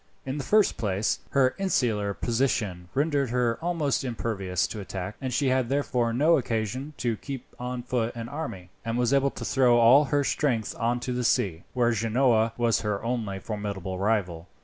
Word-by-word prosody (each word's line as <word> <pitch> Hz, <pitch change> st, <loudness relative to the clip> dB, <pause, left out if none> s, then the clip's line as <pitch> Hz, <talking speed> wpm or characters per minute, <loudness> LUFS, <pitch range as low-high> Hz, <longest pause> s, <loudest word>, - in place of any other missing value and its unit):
In 135 Hz, +2 st, -3 dB
the -, -, -3 dB
first 215 Hz, +4 st, +3 dB
place, 100 Hz, 0 st, 0 dB
her 130 Hz, -2 st, +3 dB
insular 110 Hz, -, 0 dB
position 110 Hz, -8 st, -1 dB
rendered 140 Hz, -2 st, +1 dB
her 120 Hz, -1 st, 0 dB
almost 165 Hz, -6 st, 0 dB
impervious 105 Hz, -7 st, -1 dB
to 110 Hz, -, -6 dB
attack, 95 Hz, 0 st, -5 dB
and 130 Hz, -1 st, -3 dB
she 135 Hz, +2 st, +1 dB
had 130 Hz, -2 st, +1 dB
therefore 130 Hz, -4 st, 0 dB
no 150 Hz, +7 st, +4 dB
occasion 125 Hz, +5 st, -3 dB
to 115 Hz, -3 st, -1 dB
keep 135 Hz, +1 st, -7 dB
on 125 Hz, 0 st, -4 dB
foot 120 Hz, -1 st, -2 dB
any 115 Hz, 0 st, -5 dB
army, 115 Hz, -, -6 dB
and 115 Hz, 0 st, -2 dB
was 125 Hz, +1 st, +2 dB
able 140 Hz, 0 st, +3 dB
to -, -, -7 dB
throw 125 Hz, -3 st, +4 dB
all 125 Hz, +5 st, +7 dB
her 145 Hz, 0 st, +1 dB
strength 125 Hz, -7 st, 0 dB
on 120 Hz, +1 st, +1 dB
to 125 Hz, -, -3 dB
the 125 Hz, 0 st, -1 dB
sea, 90 Hz, -7 st, +1 dB
where 120 Hz, -1 st, +3 dB
Genoa 115 Hz, 0 st, +2 dB
was 120 Hz, -2 st, +2 dB
her 105 Hz, -2 st, -2 dB
only 115 Hz, -5 st, -2 dB
formidable 100 Hz, -3 st, -4 dB
rival. 95 Hz, -5 st, 0 dB
120 Hz, 180 wpm, -27 LUFS, 105-135 Hz, -, all